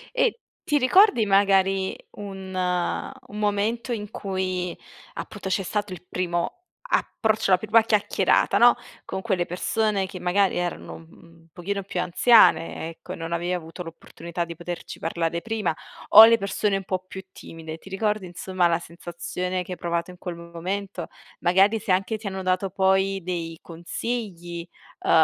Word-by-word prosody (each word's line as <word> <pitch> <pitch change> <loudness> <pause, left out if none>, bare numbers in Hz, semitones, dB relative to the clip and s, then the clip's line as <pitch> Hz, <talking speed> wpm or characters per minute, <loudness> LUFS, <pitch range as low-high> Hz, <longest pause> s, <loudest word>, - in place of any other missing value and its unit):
E 485 -2 +2 0.2
ti 295 - +2
ricordi 290 - +5
magari 195 -1 +3 0.2
un 190 -2 -8
un 185 +7 -2
momento 210 +4 0
in 210 -2 -5
cui 185 -2 -3 0.4
appunto 210 - -7
c'è 195 +1 0
stato 205 0 -2
il 180 - -11
primo 175 -1 -2 0.4
approccio, 220 -3 +1
la 185 - +7
prima 220 +4 +4
chiacchierata, 215 -2 +2
no, - - +7 0.3
con 190 - -4
quelle 190 -5 0
persone 200 +2 0
che 185 -1 -8
magari 185 +2 +2
erano 175 0 -3
un 165 0 -17
pochino 200 +3 -3
più 185 -2 -3
anziane, 175 -4 +4
ecco, 165 - -9
e - - -5
non 165 0 -6
avevi 175 +1 -1
avuto 170 0 -5
l'opportunità 170 +1 -6
di 170 -1 -8
poterci 175 0 -7
parlare 165 0 -1
prima, 220 -5 -1 0.4
o 220 +2 +12
le 230 0 +5
persone 200 0 0
un 195 - -2
po' 185 0 -2
più 190 +1 -8
timide. 160 -1 -9
Ti 180 - -18
ricordi 210 +1 -1
insomma 180 0 0
la 170 -1 +2
sensazione 175 +2 -4
che 180 - -10
hai - - -8
provato 170 +1 -2
in 180 - -14
quel 180 -1 -6
momento? 175 +2 -5 0.3
Magari 195 +5 +4
se 210 -4 +1
anche 195 +4 0
ti 215 -1 -7
hanno 190 -1 -4
dato 185 +1 +1
poi 190 0 +2
dei 165 -2 -4
consigli, 175 0 -5 0.3
uhm, - - -4
185 Hz, 160 wpm, -25 LUFS, 175-205 Hz, 0.4 s, o